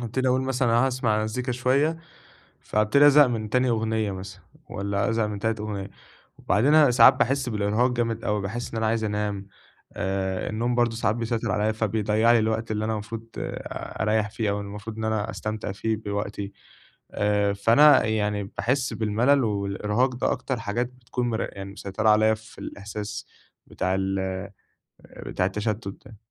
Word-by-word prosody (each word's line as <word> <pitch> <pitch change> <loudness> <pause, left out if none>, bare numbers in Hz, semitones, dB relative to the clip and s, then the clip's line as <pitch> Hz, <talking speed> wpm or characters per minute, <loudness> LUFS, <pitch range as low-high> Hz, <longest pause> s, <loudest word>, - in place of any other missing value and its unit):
هابتدي 125 +2 -1
أقول 130 +1 +2
مثلًا 130 -2 0
أنا 120 +3 +4
هاسمع 120 -5 0
مزيكا 125 +4 -2
شوية، 135 +6 +1 0.6
فابتدي 110 +7 +4
أزهق 145 0 +7
من 110 -3 -3
تاني 125 +2 +2
أغنية 110 -2 0
مثلًا 95 0 -8 0.3
والّا 100 +1 -1
أزهق 115 -1 +1
من 105 -1 -4
تالت 110 +1 -1
أغنية 100 -2 -4 0.5
وبعدين 120 +10 +2
أنا 150 -4 +6
ساعات 120 -1 +8
باحس 130 0 0
بالإرهاق 105 +4 +1
جامد 115 -2 -2
أوي، 105 -3 0
باحس 115 +5 -4
إن 115 - -4
أنا 110 - 0
عايز 115 0 0
أنام 105 -2 -2 0.5
آآ 95 -1 -2
النوم 120 +3 -1
برضه 120 -1 +2
ساعات 110 -1 0
بيسيّطر 115 -1 -2
عليَّ 105 +1 +1
فبيضيع 110 +1 +2
لي 120 - +5
الوقت 110 0 -1
اللي 110 0 -1
أنا 110 - -1
المفروض 110 +2 -6
أريّح 105 -1 -2
فيه 105 -1 -2
أو 100 - -1
المفروض 105 +2 -7
إن 110 - -4
أنا 110 -2 -1
أستمتع 110 -1 -4
فيه 110 +3 -1
بوقتي، 100 -1 -4 0.6
آآ 105 -1 +1
فأنا 115 +9 +6
يعني 105 -2 0
باحس 125 +6 -1
بالملل 120 +6 +2
والإرهاق 105 +4 0
ده 120 - 0
أكتر 130 -3 -3
حاجات 115 +3 -1
بتكون 125 0 -4
مر 110 - -2
يعني 100 0 -8
مسيّطرة 100 +2 -2
عليَّ 110 +1 +4
في 110 +1 -17
الإحساس 105 +1 -6 0.4
بتاع 95 0 -2
ال 95 0 -1
آآ 95 +1 -4 0.7
بتاع 90 - 0
التشتُت 105 +2 -2 0.2
ده. 115 - -13
110 Hz, 165 wpm, -25 LUFS, 105-120 Hz, 0.7 s, ساعات